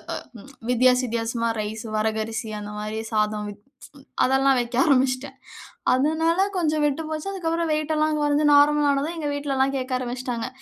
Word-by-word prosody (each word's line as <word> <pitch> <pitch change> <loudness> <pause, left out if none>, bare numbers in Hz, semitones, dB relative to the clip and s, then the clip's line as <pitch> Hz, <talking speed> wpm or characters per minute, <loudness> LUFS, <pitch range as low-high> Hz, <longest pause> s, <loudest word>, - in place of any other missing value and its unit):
அ - - -3 0.2
ம் 270 - -14 0.2
வித்தியாச 250 +1 +4
வித்தியாசமா, 230 0 -1
ரைஸு 215 +2 -5
வரகரிசி 220 +1 -2
அந்த 210 0 -7
மாரி 215 +1 -4
சாதம் 215 0 0
வித் 205 0 -11 0.4
ப்ச் 270 - -21 0.2
அதெல்லாம் 270 +1 +3
வைக்க 240 0 -5
ஆரம்பிச்சுட்டேன். 265 -1 +1 0.6
அதுனால 320 +6 +1 0.2
கொஞ்சம் 310 -3 +1
விட்டு 295 +2 0
போச்சு. 310 +4 -4
அதுக்கப்புறம் 335 -3 -1
வெயிட் 310 +1 -1
எல்லாம் 305 0 +1
கொறைஞ்சு 295 +1 +2
நார்மல் 295 0 +5
ஆனது. 280 +3 0
எங்க 300 -2 -3
வீட்லலாம் 275 -1 0
கேக்க 260 0 -4
ஆரம்பிச்சுட்டாங்க. 245 -1 -4
265 Hz, 160 wpm, -24 LUFS, 230-300 Hz, 0.6 s, நார்மல்